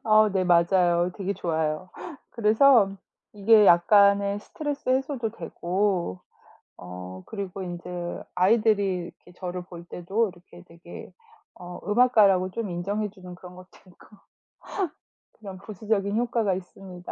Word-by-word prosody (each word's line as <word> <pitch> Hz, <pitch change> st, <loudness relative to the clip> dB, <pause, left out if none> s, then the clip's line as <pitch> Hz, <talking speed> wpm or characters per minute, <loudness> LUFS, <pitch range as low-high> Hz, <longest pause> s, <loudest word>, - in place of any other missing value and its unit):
어 215 Hz, -1 st, +5 dB
네. 190 Hz, -1 st, +1 dB
맞아요. 175 Hz, 0 st, +3 dB
되게 195 Hz, -1 st, -2 dB
좋아요. 160 Hz, -1 st, -2 dB, 0.4 s
그래서 225 Hz, 0 st, +4 dB, 0.4 s
이게 210 Hz, +1 st, +5 dB
약간의 200 Hz, +3 st, +4 dB
스트레스 290 Hz, +4 st, -6 dB
해소도 260 Hz, -3 st, 0 dB
되고 185 Hz, -, -2 dB, 0.6 s
어 90 Hz, +1 st, -9 dB
그리고 195 Hz, -2 st, -6 dB
인제 175 Hz, -1 st, -6 dB
아이들이 200 Hz, 0 st, +2 dB, 0.3 s
이렇게 175 Hz, -, -17 dB
저를 180 Hz, -1 st, -5 dB
볼 175 Hz, -1 st, -11 dB
때도 195 Hz, +6 st, -2 dB
이렇게 175 Hz, -1 st, -17 dB
되게 170 Hz, +1 st, -12 dB, 0.4 s
어 175 Hz, -1 st, -10 dB
음악가라고 210 Hz, -5 st, +4 dB
좀 215 Hz, 0 st, -4 dB
인정해 200 Hz, +5 st, -2 dB
주는 185 Hz, -2 st, -12 dB
그런 180 Hz, 0 st, -13 dB
것도 185 Hz, 0 st, -14 dB, 0.2 s
있고 180 Hz, -, -19 dB, 1.3 s
그런 195 Hz, -3 st, -9 dB
부수적인 205 Hz, 0 st, -2 dB
효과가 230 Hz, -4 st, 0 dB
있습니다. 180 Hz, -1 st, -10 dB
190 Hz, 285 characters per minute, -25 LUFS, 175-215 Hz, 1.3 s, 어